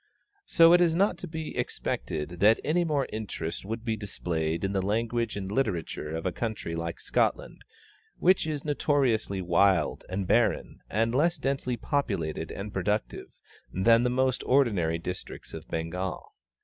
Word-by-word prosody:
So 165 0 +7
it 175 - +6
is 165 -2 +3
not 185 -1 +2
to - - -6
be 160 -1 -6
expected 80 +3 -3
that 110 +3 +5
any 175 +3 +2
more 150 -5 0
interest 105 -7 -4
would 115 +3 -5
be 115 -2 0
displayed 85 -6 -3
in 95 0 -1
the 95 - +1
language 115 +3 -1
and 95 -1 -4
literature 85 - -2
of 80 - -4
a 95 - +1
country 110 -5 -4
like 85 0 -4
Scotland, - - -1 0.5
which 185 -2 +3
is 150 -2 -3
notoriously 130 -10 +1
wild 90 -1 +2
and 95 +1 -2
barren - - +1
and 115 +2 +1
less 165 +6 +2
densely 135 -3 -1
populated 90 - -2
and 100 +1 -6
productive 105 +3 -2 0.4
than 115 +5 +4
the 125 - +2
most 130 0 +1
ordinary 100 -12 +3
districts 90 +2 -7
of - - -8
Bengal. 85 +3 -4
110 Hz, 155 wpm, -28 LUFS, 90-135 Hz, 0.5 s, So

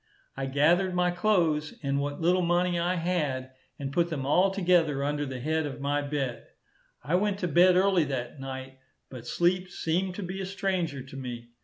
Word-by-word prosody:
I 135 0 -3
gathered 170 +7 +3
my 180 0 +2
clothes, 175 -6 +1
and 140 0 0
what 145 0 -3
little 180 +2 +3
money 175 0 +1
I 175 +2 +1
had, 150 -7 -1 0.3
and 140 -2 -5
put 170 +1 +2
them 145 -5 -3
all 180 +7 +4
together 175 -7 +2
under 145 0 -1
the 130 -1 -5
head 155 +3 0
of 140 - -7
my 145 +1 0
bed. 140 -4 -3 0.6
I 145 +6 -3
went 200 +2 +2
to 180 - 0
bed 180 +3 +5
early 185 -3 +4
that 130 -1 -4
night, 130 0 -7 0.3
but 120 -2 -9
sleep 180 +4 +1
seemed 180 +2 -1
to 205 - -5
be 185 +2 -5
a - - -3
stranger 185 -8 -2
to 135 +1 -12
me. 120 -3 -6
160 Hz, 190 wpm, -28 LUFS, 140-180 Hz, 0.6 s, bed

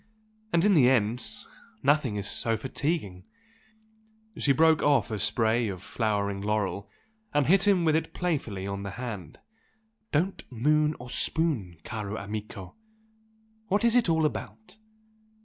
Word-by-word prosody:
And 170 +2 +3
in 205 - +5
the 135 -8 +6
end 120 -1 +1 0.6
nothing 140 -6 +2
is 100 0 -3
so 115 -1 -1
fatiguing!" 130 - -3 1.1
She 140 - +2
broke 160 +3 +4
off 140 -7 +2
a 105 - -2
spray 110 +3 +2
of 95 -3 -6
flowering 100 -3 -1
laurel 100 -1 -2 0.5
and 145 -2 +3
hit 195 +6 +4
him 185 -4 +4
with 155 -1 +3
it 160 - -1
playfully 130 - -2
on 100 0 -4
the 100 - -5
hand. 105 -11 -6 0.7
"Don't 175 +6 0
moon 150 +5 +2
or 125 0 -9
spoon, 130 - -1
caro 105 -1 -5
amico! 100 -2 -7 0.9
What 205 +3 +1
is 235 0 +3
it 240 -7 +3
all 160 -1 +3
about? 215 +8 -5
125 Hz, 140 wpm, -27 LUFS, 105-155 Hz, 1.1 s, the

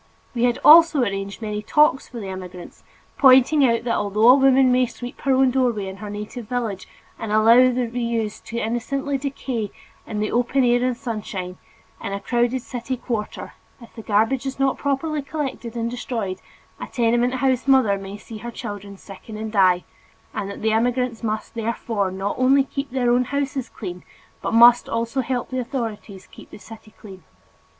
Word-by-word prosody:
We 240 -1 +1
had 240 -1 +1
also 325 -2 +8
arranged 195 0 -4
many 210 -1 -3
talks 295 +3 +2
for 240 - -8
the 205 - -7
immigrants, 185 -1 -9 0.4
pointing 265 +2 +6
out 230 -3 +2
that 235 -1 -1
although 210 +3 +2
a - - +10
woman 265 -1 +4
may 250 0 +3
sweep 245 +2 -9
her 275 - +2
own 260 -1 +4
doorway 240 -6 0
in 190 0 -7
her 210 +1 -8
native 210 +2 -7
village 230 -6 -3 0.3
and 225 -2 -5
allow 230 +4 +6
the 250 0 -1
reuse 230 -2 -3
to 235 - -6
innocently 270 +5 -2
decay 260 -6 -4 0.4
in 210 - -4
the 215 - -1
open 245 +3 +1
air 245 0 +3
and 250 -1 0
sunshine, 200 -6 -5 0.4
in 195 - -4
a 200 - -3
crowded 240 +3 0
city 255 +1 -5
quarter, 225 -4 -5 0.3
if 235 -2 -15
the 225 - -9
garbage 225 +6 +1
is 265 - -5
not 270 -1 0
properly 290 +2 -1
collected 270 -5 -5
and 230 0 -2
destroyed, 225 -6 -4 0.4
a - - -6
tenement 240 +1 +1
house 260 0 0
mother 260 -7 +4
may 195 +1 -8
see 215 +1 -10
her 240 - -7
children 205 -3 -8
sicken 205 +3 -11
and 220 0 -5
die, 185 -4 +3 0.5
and 200 - -4
that 200 - -8
the 220 - +2
immigrants 245 +1 0
must 215 -2 -3
therefore 225 -3 -2
not 190 +2 -3
only 270 +2 +4
keep 275 +1 -5
their 245 -2 0
own 250 +1 +2
houses 280 -1 -3
clean, 180 -3 -8 0.4
but - - -3
must 235 +1 +6
also 230 +3 -1
help 250 0 -3
the 255 - -2
authorities 225 -6 -5
to - - -23
keep - - -15
the - - -11
city 220 +1 -13
clean. 190 -3 -12
235 Hz, 185 wpm, -22 LUFS, 210-255 Hz, 0.5 s, a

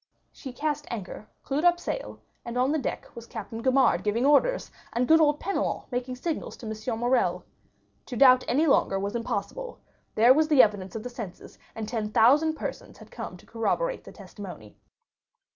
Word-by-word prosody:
She 265 - -9
cast 295 +2 -3
anchor, 215 -1 -7 0.2
clued 280 +4 -1
up 350 0 +4
sails, - - -5 0.2
and 235 +1 -5
on 255 +3 +2
the 310 - +1
deck - - -5
was 235 0 -9
Captain 225 0 -7
Gaumard 260 +1 +3
giving 220 +4 0
orders, 295 - +3 0.2
and 245 +1 0
good 320 0 +6
old 295 -1 +3
Penelon 395 +2 -2
making 250 +1 -3
signals 315 +5 -4
to - - -11
M. 220 +2 -4
Morrel. 245 +2 +1 0.6
To 245 - -5
doubt 255 -1 +7
any 295 +6 +2
longer 195 -9 +2
was 200 +3 -3
impossible; 485 - -4 0.4
there 235 +4 +7
was 310 +2 +2
the 295 -4 +7
evidence 205 -2 -2
of 220 - -5
the 250 - -5
senses, 215 -7 -9 0.2
and 220 -1 -5
ten 220 -2 -3
thousand 290 +9 +4
persons - - -7
who - - -13
came - - -8
to - - -19
corroborate - - -1
the - - -11
testimony. 180 - -11
250 Hz, 180 wpm, -27 LUFS, 225-295 Hz, 0.6 s, doubt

